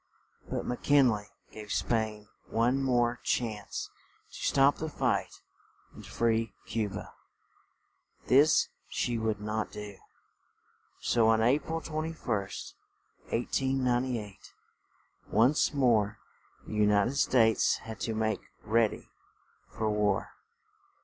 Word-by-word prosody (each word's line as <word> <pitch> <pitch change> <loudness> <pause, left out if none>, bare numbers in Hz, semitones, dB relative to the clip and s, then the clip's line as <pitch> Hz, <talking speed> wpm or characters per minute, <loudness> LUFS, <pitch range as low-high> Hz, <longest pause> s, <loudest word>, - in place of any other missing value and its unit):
But - - -3
Mc 125 - -3
Kin 140 -4 +5
ley 105 -1 -4 0.2
gave 105 -2 -9
Spain 110 -2 -1 0.2
one 120 +4 +1
more 120 -2 +1
chance 110 -4 -2 0.4
to - - -13
stop 140 +1 +4
the 160 - -4
fight - - -1 0.5
and - - -12
free 115 -1 0
Cu 110 -2 -1
ba; 100 +2 -8 1.1
this 145 +4 +5 0.2
she 120 -1 -1
would 110 -2 -1
not 105 +1 -3
do. 105 -2 -8 1.0
So 115 -2 +3
on 110 0 +4
A 130 +6 +4
pril 160 +2 -4
21st, 155 -11 -3 0.6
1898, 125 -3 -1 0.7
once 125 +8 +3
more 115 -8 +2 0.5
the - - -8
U 105 -1 +3
nit 100 +1 +3
ed - - -4
States 115 -5 +3
had 110 -2 -7
to 110 +3 -2
make 110 -2 0 0.2
read 110 0 +3
y - - -11 0.6
for 110 - -3
war. 105 -2 0
115 Hz, 120 wpm, -30 LUFS, 105-130 Hz, 1.1 s, Kin